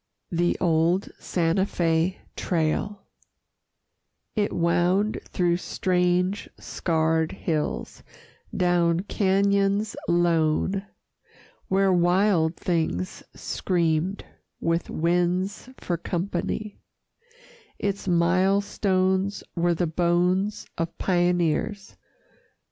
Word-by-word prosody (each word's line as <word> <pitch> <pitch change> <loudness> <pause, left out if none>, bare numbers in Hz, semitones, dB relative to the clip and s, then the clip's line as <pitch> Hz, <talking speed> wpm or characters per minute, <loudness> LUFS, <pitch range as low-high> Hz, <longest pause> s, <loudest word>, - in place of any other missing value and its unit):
THE 175 0 +1
OLD 170 +2 +2
SANTA 175 +2 +1
FÉ 170 0 +1 0.2
TRAIL 180 +4 -1 1.3
It 210 -2 +1
wound 175 +5 +1
through 175 -2 +1
strange 180 +2 0
scarred 160 -1 0
hills, 150 - -3 0.6
down 175 -1 +2
cañons 200 +1 +1
lone 175 +3 +1 0.8
Where 195 0 +3
wild 175 -1 +3
things 160 - -2
screamed, 170 +1 -1 0.3
with 165 +1 -1
winds 180 +6 0
for 175 - -2
company; 200 +4 -3 1.0
Its 200 -1 -3
mile 185 +3 +3
stones 190 0 0
were 175 0 +2
the 175 - 0
bones 180 +5 +1
of 165 0 -3
pioneers. 175 +3 0
180 Hz, 80 wpm, -25 LUFS, 170-195 Hz, 1.3 s, Where